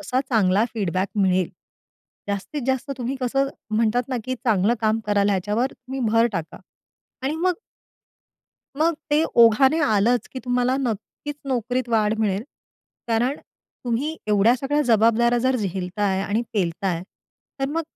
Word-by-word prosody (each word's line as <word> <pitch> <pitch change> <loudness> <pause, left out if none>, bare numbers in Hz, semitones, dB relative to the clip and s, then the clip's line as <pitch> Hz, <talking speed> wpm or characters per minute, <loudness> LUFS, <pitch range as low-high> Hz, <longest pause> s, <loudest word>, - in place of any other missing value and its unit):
कसा 260 -4 0
चांगला 205 -2 +3
फीडबॅक 190 -2 -1
मिळेल 185 -2 +2 0.8
जास्तीत 220 +9 -3
जास्त 265 +1 -1
तुम्ही 250 +2 -3
कसं 270 +2 +1 0.3
म्हणतात 230 +2 +2
ना, 260 - -1
की 255 - -2
चांगलं 230 -3 +1
काम 220 0 +1
कराल 205 -1 +2
ह्याच्यावर 210 +7 0
तुम्ही 265 +1 -7
भर 230 +1 +5
टाका. 165 -4 -5 0.6
आणि 275 +3 -1
मग 360 +2 +1 1.2
मग 330 +2 +3 0.2
ते 300 +2 +4 0.2
ओघाने 265 +7 +6
आलंच, 225 0 +2
की 260 - -7
तुम्हाला 250 +1 +1
नक्कीच 260 +3 -4
नोकरीत 250 0 -1
वाढ 220 -2 +2
मिळेल. 205 -2 0 0.7
कारण 240 +5 +1 0.5
तुम्ही 260 +7 -1
एवढ्या 210 +3 +4
सगळ्या 280 +3 0
जबाबदाऱ्या 230 +2 +4
जर 260 +2 +1
झेलताय 190 -1 -1
आणि 210 +4 0
पेलताय 180 -2 -1 0.6
तर 270 - +1
मग 325 +3 -1
230 Hz, 135 wpm, -23 LUFS, 205-260 Hz, 1.2 s, ओघाने